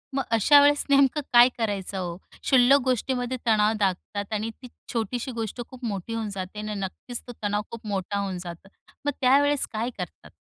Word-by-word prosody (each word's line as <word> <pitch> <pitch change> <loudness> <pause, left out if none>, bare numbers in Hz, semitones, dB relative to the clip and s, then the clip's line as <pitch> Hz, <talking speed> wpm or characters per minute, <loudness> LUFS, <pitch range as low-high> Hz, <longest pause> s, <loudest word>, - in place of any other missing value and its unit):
मग 270 - +1
अशा 285 +7 +7
वेळेस 290 0 +4
नेमकं 280 +1 +4
काय 240 +1 +8
करायचं 205 -4 -2
हो? 175 -2 -4 0.3
शुल्लक 265 +1 +5
गोष्टीमध्ये 255 0 -1
तणाव 215 -1 +4
दाखतात 200 +1 -2
आणि 215 +1 -1
ती 255 - -9 0.3
छोटीशी 240 +3 -2
गोष्ट 225 +2 -4
खूप 255 -1 -9
मोठी 205 0 -4
होऊन 225 -2 -2
जाते. 190 +2 -6
आणि 215 0 -4
नक्कीच 215 +5 -5
तो - - -6
तणाव 205 0 0
खूप 230 -2 -8
मोठा 200 0 -2
होऊन 195 -2 -3
जातं. 170 +2 -9 0.4
मग 290 - +2
त्यावेळेस 280 +2 +4
काय 225 +3 -1
करतात? 180 -4 -8
225 Hz, 180 wpm, -25 LUFS, 200-255 Hz, 0.4 s, काय